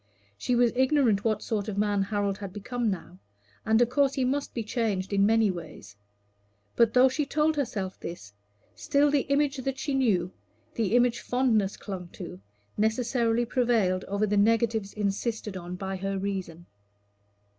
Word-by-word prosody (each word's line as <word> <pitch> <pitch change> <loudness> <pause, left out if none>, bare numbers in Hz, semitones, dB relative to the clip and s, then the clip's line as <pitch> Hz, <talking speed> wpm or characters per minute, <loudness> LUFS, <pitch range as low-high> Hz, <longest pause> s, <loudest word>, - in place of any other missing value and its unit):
She 245 - -1
was 240 -1 +3
ignorant 260 -6 +3
what 215 -2 0
sort 210 -2 -2
of 205 -2 -4
man 205 -1 +1
Harold 200 0 -1
had 200 -2 -6
become 230 +4 -2
now, 185 -1 -6 0.4
and 220 0 +3
of 240 - -1
course 275 +1 +2
he 265 - +1
must 280 +3 -1
be 230 - -2
changed 210 -4 -2
in 200 0 +4
many 220 -2 +3
ways; 155 - -10 0.8
but 235 0 +3
though 255 +1 +7
she 265 +4 -1
told 305 +2 +1
herself 205 -9 -3
this, 105 -12 -8 0.4
still 290 -1 +2
the 285 -2 +1
image 285 0 +2
that 265 0 -3
she 285 - -3
knew, 200 -10 +1 0.4
the 220 -1 0
image 245 -1 +3
fondness 230 -6 +1
clung 185 -3 -6
to, 90 - -8 0.4
necessarily 230 +1 +1
prevailed 225 -7 +1
over 200 +2 0
the 210 0 0
negatives 220 -1 +2
insisted 210 +1 -2
on 180 0 -6
by 190 +1 -4
her 195 +1 -3
reason. 190 -4 -4
220 Hz, 165 wpm, -27 LUFS, 195-250 Hz, 0.8 s, though